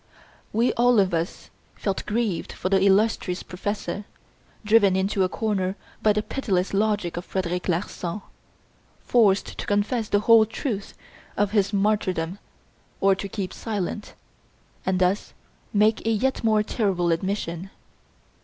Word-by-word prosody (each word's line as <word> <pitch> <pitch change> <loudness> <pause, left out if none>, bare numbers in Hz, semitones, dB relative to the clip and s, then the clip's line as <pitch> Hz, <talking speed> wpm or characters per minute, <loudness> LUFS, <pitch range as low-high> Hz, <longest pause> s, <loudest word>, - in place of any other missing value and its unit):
We 230 +3 +2
all 245 -1 +4
of 190 -3 +2
us 165 +1 -3 0.2
felt 195 -2 -3
grieved 210 -5 -1
for 185 - -3
the 195 -1 +3
illustrious 195 -2 +2
professor, 205 +2 -4 0.6
driven 210 -3 +5
into 190 +1 +1
a 185 - +1
corner 195 -4 -1 0.3
by 215 - +4
the 210 0 0
pitiless 195 -10 -1
logic 205 -4 0
of 175 - -4
Frederic 180 -1 -2
Larsan, 180 +2 -2 0.8
forced 205 -5 +2
to - - -4
confess 210 +2 0
the 205 - +2
whole 225 0 +6
truth 220 -3 -4 0.4
of 205 -1 +1
his 205 -2 +2
martyrdom 195 -3 0 0.6
or 195 0 +4
to 195 +1 -5
keep 195 -2 -4
silent, 210 -1 -4 0.7
and 190 -1 +2
thus 185 +2 0 0.4
make 215 +1 +3
a - - +4
yet 250 +5 0
more 215 -1 +3
terrible 190 -6 0
admission. 180 0 -2
200 Hz, 135 wpm, -24 LUFS, 185-215 Hz, 0.8 s, whole